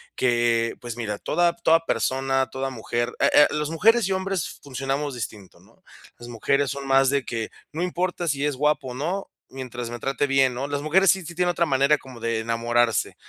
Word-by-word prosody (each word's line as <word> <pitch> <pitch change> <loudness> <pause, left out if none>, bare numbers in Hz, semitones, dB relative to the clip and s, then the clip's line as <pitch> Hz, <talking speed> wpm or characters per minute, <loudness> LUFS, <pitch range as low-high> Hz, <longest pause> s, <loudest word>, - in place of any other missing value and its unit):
que, 120 -2 +2
pues 120 -1 -6
mira, 105 -3 -3
toda 175 -1 +1
toda 165 -1 +4
persona, 135 +3 0
toda 135 0 -4
mujer, 120 0 -3
eh, - - +5
ah, 145 - +8
las 150 0 -1
mujeres 225 +7 +4
y 195 - -2
hombres 190 -1 -3
funcionamos 135 +1 -3
distintos, 105 -5 -8
¿no? - - -24 0.4
Las 120 - -11
mujeres 130 +4 0
son 140 0 -5
más 135 0 +4
de 140 -2 +1
que 115 -2 -4 0.2
no 160 +4 -3
importa 180 -1 -2
si 140 -1 0
es 145 -2 0
guapo 150 -1 0
o 125 - -6
no, 175 +9 -3 0.2
mientras 125 -2 -6
me 120 - -6
trate 135 +1 -1
bien, 135 -2 +3
¿no? 135 +3 -3
Las 145 0 -3
mujeres 175 +4 +4
sí 190 -2 -2
sí 170 +1 -8
tienen 180 0 +2
otra 170 -1 +1
manera 140 +2 +3
como 130 -3 -12
de 115 -1 -1
enamorarse, 115 0 0
135 Hz, 205 wpm, -24 LUFS, 120-155 Hz, 0.4 s, ah